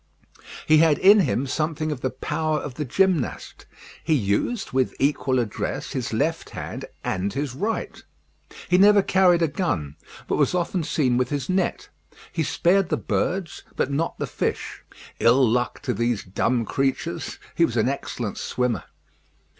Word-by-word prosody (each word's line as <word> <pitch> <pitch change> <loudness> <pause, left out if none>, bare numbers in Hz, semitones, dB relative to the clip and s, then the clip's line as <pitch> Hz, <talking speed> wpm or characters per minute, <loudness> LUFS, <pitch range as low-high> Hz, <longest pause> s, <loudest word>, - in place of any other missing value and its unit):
He 155 0 +5
had 160 -3 +4
in 205 +3 +7
him 140 -6 +1
something 155 +2 -2
of 140 -4 -5
the 130 - 0
power 155 +4 -2
of 145 -2 -5
the 150 +3 -4
gymnast. 180 +1 0 0.4
He 160 0 +2
used, 120 - -1
with 130 -1 0
equal 135 -2 +1
address, 115 -4 -3
his - - -3
left - - -1
hand - - -6 0.2
and 95 +2 -1
his 140 -2 -3
right. 210 +12 -3 0.7
He 180 +1 +4
never 205 0 +6
carried 180 -3 +4
a - - +3
gun; 90 - -2 0.3
but - - 0
was - - +2
often 175 0 -1
seen 135 -6 +1
with 125 -1 0
his 145 +1 -3
net. 185 +1 -1 0.4
He 165 - -1
spared 175 +4 +2
the - - +1
birds, 180 -3 -2
but 135 - 0
not 160 +4 -1
the - - -2
fish. - - -3 0.4
Ill 125 +2 +5
luck 120 +2 0
to - - -1
these 120 -2 -1
dumb 115 +5 0
creatures! 140 +8 -2 0.2
He 170 - +2
was 120 -7 +1
an 110 - +3
excellent 125 -5 -3
swimmer. 125 -5 -1
145 Hz, 160 wpm, -24 LUFS, 125-170 Hz, 0.7 s, in